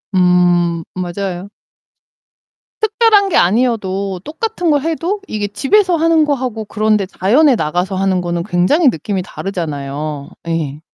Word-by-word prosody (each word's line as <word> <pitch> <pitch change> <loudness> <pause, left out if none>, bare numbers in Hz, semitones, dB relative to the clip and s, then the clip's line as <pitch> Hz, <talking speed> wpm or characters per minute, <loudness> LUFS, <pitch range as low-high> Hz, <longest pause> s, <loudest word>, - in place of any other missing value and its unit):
음, 175 -2 +3
맞아요. 185 +1 -4 1.3
특별한 430 -2 +3
게 - - +2
아니어도 195 -3 +1
똑같은 355 +2 -3
걸 290 -2 +2
해도 335 +6 -2
이게 210 -1 -3
집에서 360 - +2
하는 325 -1 +3
거하고 255 -7 -2
그런데 215 -1 +1
자연에 245 +10 +3
나가서 180 +3 -1
하는 190 -1 +1
거는 170 -1 -2
굉장히 255 - +3
느낌이 190 +1 -3
다르잖아요. 150 -6 -5 0.2
예. 155 -3 -2
200 Hz, 290 characters per minute, -16 LUFS, -, 1.3 s, 음